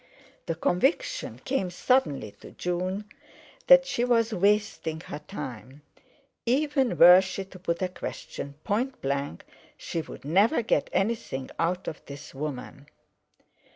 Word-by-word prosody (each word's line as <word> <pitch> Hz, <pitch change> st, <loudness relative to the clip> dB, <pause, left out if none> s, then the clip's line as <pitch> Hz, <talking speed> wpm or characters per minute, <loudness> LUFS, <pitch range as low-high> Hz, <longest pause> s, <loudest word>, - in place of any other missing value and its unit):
The 165 Hz, -, -1 dB
conviction 300 Hz, -, 0 dB
came 255 Hz, -9 st, 0 dB
suddenly 175 Hz, -, +1 dB
to -, -, -10 dB
June 185 Hz, +3 st, -3 dB, 0.6 s
that -, -, +8 dB
she 240 Hz, -, -1 dB
was 230 Hz, -2 st, +2 dB
wasting 200 Hz, -5 st, +1 dB
her 145 Hz, -, -7 dB
time; 135 Hz, -, -8 dB, 0.6 s
even 270 Hz, +1 st, +1 dB
were 180 Hz, +1 st, +9 dB
she 190 Hz, +1 st, -5 dB
to 185 Hz, -1 st, -13 dB
put 170 Hz, 0 st, -2 dB
a -, -, +2 dB
question 140 Hz, -5 st, -7 dB
point 245 Hz, +6 st, -1 dB
blank, 140 Hz, -9 st, -2 dB, 0.3 s
she 165 Hz, -, -3 dB
would 155 Hz, -, -11 dB
never 205 Hz, -, +3 dB
get 225 Hz, -, +1 dB
anything 195 Hz, -, -1 dB
out 180 Hz, +2 st, 0 dB
of 155 Hz, -, -6 dB
this 140 Hz, +1 st, -9 dB
woman. 140 Hz, 0 st, -6 dB
185 Hz, 130 wpm, -27 LUFS, 150-230 Hz, 0.6 s, were